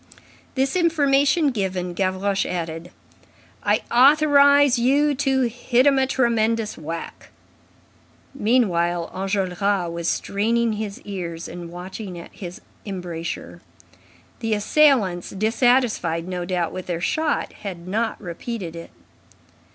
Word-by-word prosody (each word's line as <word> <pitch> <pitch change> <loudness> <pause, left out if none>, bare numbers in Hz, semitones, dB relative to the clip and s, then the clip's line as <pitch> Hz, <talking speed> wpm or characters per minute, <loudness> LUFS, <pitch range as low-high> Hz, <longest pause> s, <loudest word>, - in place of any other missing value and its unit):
This 270 +3 0
information 290 -3 +3
given, 185 -5 -2
Gavroche 190 +1 0
added: 165 -1 -4 0.7
"I - - +1
authorize 285 0 +5
you 285 +4 +3
to 270 -1 +1
hit 245 +1 +1
'em 275 -2 +5
a 265 - +2
tremendous 230 -3 +1
whack." 165 +1 -7 1.0
Meanwhile, 175 -9 +1
Enjolras 190 -1 -1
was 170 0 -4
straining 225 +5 0
his 210 -1 -5
ears 170 -5 -6
and 175 -1 -8
watching 180 +2 -7
at 170 - -11
his 180 +3 -8 0.2
embrasure. 175 -4 -6 0.8
The 225 -2 0
assailants, 210 - +3
dissatisfied, 215 -6 +1
no 180 -1 -3
doubt, 175 -2 -1
with 185 - -6
their 175 -2 -2
shot, 310 - -1
had 180 -4 -8
not 225 +4 -1
repeated 180 0 -6
it. 170 - -9
205 Hz, 110 wpm, -22 LUFS, 175-255 Hz, 1.0 s, authorize